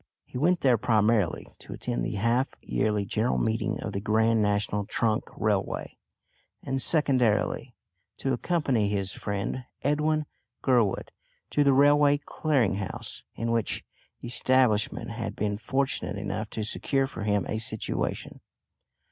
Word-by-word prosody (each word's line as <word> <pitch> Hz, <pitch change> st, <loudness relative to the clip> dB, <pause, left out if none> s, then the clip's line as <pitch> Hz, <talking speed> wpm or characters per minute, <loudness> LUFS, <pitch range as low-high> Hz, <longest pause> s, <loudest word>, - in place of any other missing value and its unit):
He -, -, -17 dB
went 170 Hz, +7 st, +2 dB
there 125 Hz, -5 st, +4 dB
primarily 110 Hz, -5 st, +2 dB
to -, -, -9 dB
attend -, -, -3 dB
the -, -, -3 dB
half 115 Hz, +6 st, +1 dB
yearly 105 Hz, -, -1 dB
general 110 Hz, +5 st, 0 dB
meeting 110 Hz, -1 st, -1 dB
of -, -, -3 dB
the 100 Hz, -, -2 dB
Grand 110 Hz, +1 st, +2 dB
National 105 Hz, 0 st, 0 dB
Trunk 110 Hz, +2 st, 0 dB
Railway, -, -, -1 dB, 0.7 s
and 135 Hz, 0 st, -1 dB
secondarily, 130 Hz, -, +3 dB, 0.4 s
to 135 Hz, -, -1 dB
accompany 130 Hz, -, 0 dB
his 100 Hz, -2 st, -1 dB
friend 100 Hz, +5 st, -3 dB, 0.2 s
Edwin 150 Hz, +1 st, +1 dB, 0.4 s
Gurwood 120 Hz, -7 st, +2 dB, 0.4 s
to 145 Hz, -, +3 dB
the 140 Hz, -, +4 dB
Railway 145 Hz, +1 st, +5 dB
Clearing 135 Hz, -9 st, 0 dB
House, 100 Hz, -1 st, -4 dB
in 115 Hz, 0 st, -2 dB
which 115 Hz, -2 st, -1 dB, 0.4 s
establishment 120 Hz, -3 st, +2 dB
he 115 Hz, -, -8 dB
had 115 Hz, -, -4 dB
been 105 Hz, 0 st, -1 dB
fortunate 130 Hz, -6 st, -1 dB
enough 105 Hz, +1 st, -4 dB
to 110 Hz, -, -4 dB
secure 135 Hz, +5 st, 0 dB
for 135 Hz, -, -8 dB
him 105 Hz, -1 st, +1 dB
a 110 Hz, -, -2 dB
situation. 110 Hz, -1 st, -3 dB
115 Hz, 140 wpm, -27 LUFS, 105-135 Hz, 0.7 s, Railway